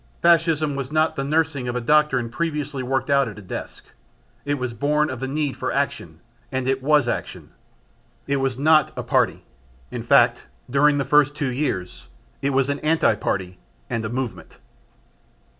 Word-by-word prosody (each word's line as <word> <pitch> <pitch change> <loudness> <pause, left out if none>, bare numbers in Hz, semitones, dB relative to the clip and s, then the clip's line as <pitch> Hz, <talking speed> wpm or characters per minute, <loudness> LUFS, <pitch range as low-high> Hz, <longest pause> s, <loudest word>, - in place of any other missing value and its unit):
Fascism 165 -3 +3
was 135 -1 -4
not 155 +1 +2
the 135 - -2
nursling 150 -3 0
of 120 - -3
a - - 0
doctrine 135 -2 +2
previously 150 -2 -3
worked 135 +3 -1
out 140 -2 +4
at 110 - -8
a - - -9
desk; 90 - -7 0.6
it 145 0 0
was 125 -3 -4
born 150 +4 +1
of 130 - -6
the 135 - -3
need 145 0 -2
for - - -3
action - - -3 0.3
and 130 -1 -2
it 135 0 0
was 145 -1 +3
action. - - -4 0.7
It 140 0 0
was 135 -2 -1
not 155 +1 +4
a - - -3
party, - - +1 0.5
in - - -4
fact - - +3 0.2
during 145 +3 +3
the 140 - 0
first 145 -1 +3
two 145 -4 -2
years, 95 - -3 0.3
it 140 - 0
was 135 -1 +2
an 140 0 -2
anti 160 -5 +2
party 95 -3 -3 0.3
and 115 -2 -1
a 110 - -3
movement. 115 -9 -5
140 Hz, 175 wpm, -23 LUFS, 125-150 Hz, 0.7 s, out